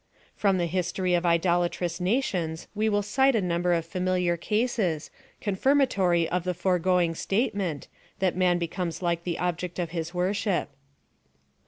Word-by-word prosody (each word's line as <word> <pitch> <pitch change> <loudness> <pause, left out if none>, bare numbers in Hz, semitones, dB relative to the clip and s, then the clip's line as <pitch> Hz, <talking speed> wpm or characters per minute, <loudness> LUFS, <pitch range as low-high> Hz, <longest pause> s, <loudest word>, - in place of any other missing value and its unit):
From 195 -2 +2
the 175 - +1
history 180 +1 -1
of 175 0 +2
idolatrous 175 0 +1
nations 180 -6 -1
we 215 +1 +1
will 205 -1 +1
cite 265 +6 +3
a - - +3
number 175 0 0
of 165 -1 +1
familiar 180 0 0
cases, 210 -4 -1 0.3
confirmatory 195 - +2
of 180 0 -1
the 180 0 -2
foregoing 180 -1 +2
statement, 195 - -1 0.3
that 190 -2 +1
man 180 -1 +3
becomes 170 +1 -3
like 170 -1 -1
the 175 -2 -2
ob 175 -1 -1
ject 180 -1 -5
of 170 -3 -2
his 165 -1 -3
worship. 185 0 0
180 Hz, 150 wpm, -27 LUFS, 170-195 Hz, 0.3 s, cite